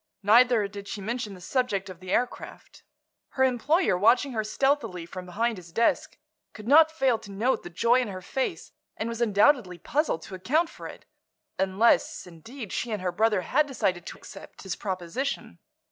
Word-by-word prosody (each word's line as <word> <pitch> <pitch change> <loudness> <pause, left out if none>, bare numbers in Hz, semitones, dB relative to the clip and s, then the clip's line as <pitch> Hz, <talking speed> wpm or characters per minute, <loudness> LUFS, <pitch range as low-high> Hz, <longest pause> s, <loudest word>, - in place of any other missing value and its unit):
Neither 230 0 +5
did 200 0 -9
she 205 - -5
mention 215 0 -4
the 180 - -14
subject 205 -2 -1
of 185 -3 -10
the 185 0 -10
aircraft. 245 0 -3 0.5
Her 265 - +2
employer, 265 - +2
watching 235 +9 +3
her 220 -3 -1
stealthily 225 - 0
from 180 +1 -9
behind 225 +5 -1
his 175 -2 -12
desk, 230 +7 +1 0.4
could 215 0 -10
not 315 +4 +7
fail 270 -8 +1
to 205 - -13
note 220 +7 0
the - - -9
joy 235 +8 +3
in 245 - -3
her 190 -2 -6
face 265 +6 -3 0.3
and 220 - -3
was 230 0 -5
undoubtedly 210 -3 +3
puzzled 285 - -1
to - - -11
account 305 - 0
for - - -9
it—unless, 195 +4 -1
indeed, 200 - -10
she 240 - -2
and 210 -4 -3
her 180 - 0
brother 215 -1 +2
had 290 - +1
decided 185 -10 -2
to - - -8
accept - - -12
his 190 -3 -4
proposition. 190 +8 -4
220 Hz, 175 wpm, -27 LUFS, 185-255 Hz, 0.5 s, not